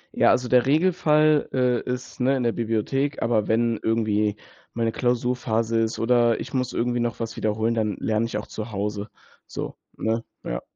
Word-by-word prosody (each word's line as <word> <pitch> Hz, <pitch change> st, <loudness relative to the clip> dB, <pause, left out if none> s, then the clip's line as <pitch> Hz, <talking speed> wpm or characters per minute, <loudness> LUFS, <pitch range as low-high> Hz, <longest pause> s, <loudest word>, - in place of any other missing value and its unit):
Ja, -, -, +4 dB
also 125 Hz, 0 st, +2 dB
der 125 Hz, +1 st, +4 dB
Regelfall, 155 Hz, -2 st, +3 dB
äh 125 Hz, -1 st, +1 dB
is, 125 Hz, +1 st, -6 dB
ne, 135 Hz, +2 st, +2 dB
in 125 Hz, -, -1 dB
der 115 Hz, -, +2 dB
Bibliothek, 120 Hz, +6 st, -1 dB
aber 115 Hz, -3 st, +1 dB
wenn 115 Hz, 0 st, +1 dB
irgendwie 105 Hz, -2 st, +1 dB, 0.4 s
meine 115 Hz, -1 st, 0 dB
Klausurphase 120 Hz, -2 st, 0 dB
ist 115 Hz, 0 st, 0 dB
oder 120 Hz, 0 st, +3 dB
ich -, -, -7 dB
muss 130 Hz, -2 st, 0 dB
irgendwie 120 Hz, +1 st, 0 dB
noch 120 Hz, 0 st, -2 dB
was 115 Hz, -1 st, -4 dB
wiederholen, 110 Hz, +2 st, 0 dB
dann 105 Hz, -4 st, 0 dB
lerne 110 Hz, +1 st, 0 dB
ich 105 Hz, -, -3 dB
auch 105 Hz, -, -5 dB
zu 110 Hz, +1 st, -7 dB
Hause, 105 Hz, +1 st, -3 dB, 0.4 s
so, -, -, -5 dB, 0.2 s
ne? 115 Hz, +1 st, -1 dB, 0.2 s
Ja. -, -, -3 dB
115 Hz, 180 wpm, -24 LUFS, 110-125 Hz, 0.4 s, Ja